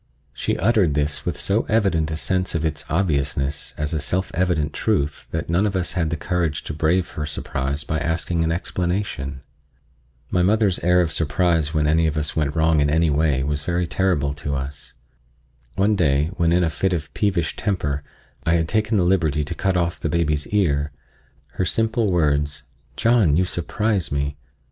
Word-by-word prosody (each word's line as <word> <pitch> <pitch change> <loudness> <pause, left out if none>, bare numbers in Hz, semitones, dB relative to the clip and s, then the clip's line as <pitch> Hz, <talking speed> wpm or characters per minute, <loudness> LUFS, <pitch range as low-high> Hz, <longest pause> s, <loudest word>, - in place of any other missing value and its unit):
She - - -2
uttered 100 - +2
this 75 0 -1
with 90 - -1
so 100 +3 +1
evident 95 -9 +2
a 80 - -3
sense 90 +1 -1
of 80 -1 0
its 80 -2 -2
obviousness 70 -4 -1
as 75 +2 -1
a 80 - 0
self 90 +6 0
evident 85 -4 0
truth 75 +1 -1
that 80 0 -3
none 90 +6 +2
of 100 - -3
us 90 -2 0
had 85 -3 0
the 85 - -2
courage 85 -2 -1
to - - -5
brave 80 +4 +1
her 75 0 -4
surprise 70 0 -3
by 80 - -2
asking 80 +2 -1
an 80 - +1
explanation. 85 -6 -2 0.9
My 90 - +2
mother's 100 0 +2
air 90 +1 +3
of 85 -2 0
surprise 80 0 +1
when 75 -1 +2
any 80 +2 +3
of 80 0 -2
us 75 0 -1
went 75 -2 0
wrong 80 -1 +3
in 75 0 +2
any 80 +1 +2
way 70 -3 +2
was 75 +1 -2
very 85 +1 0
terrible 85 -6 0
to 70 0 -4
us. 70 +2 -6 0.8
One 105 +2 +2
day, 75 -3 +2
when 85 -1 +2
in 90 +1 +3
a 80 - +1
fit 95 +6 0
of 75 -4 -4
peevish 95 -6 0
temper, 75 -8 -1 0.4
I 80 - +2
had 80 -1 +1
taken 110 +3 +1
the 95 - +3
liberty 80 -5 +2
to 75 - -4
cut 95 +1 0
off 85 -1 -1
the 80 - -2
baby's 75 -2 0
ear, 75 -8 +1 0.7
her - - +1
simple 110 +2 +1
words, 75 -4 +1 0.3
"John, 110 -10 +4
you 95 - +3
surprise 100 +2 -1
me!" 70 0 -1
80 Hz, 185 wpm, -22 LUFS, 75-90 Hz, 0.9 s, John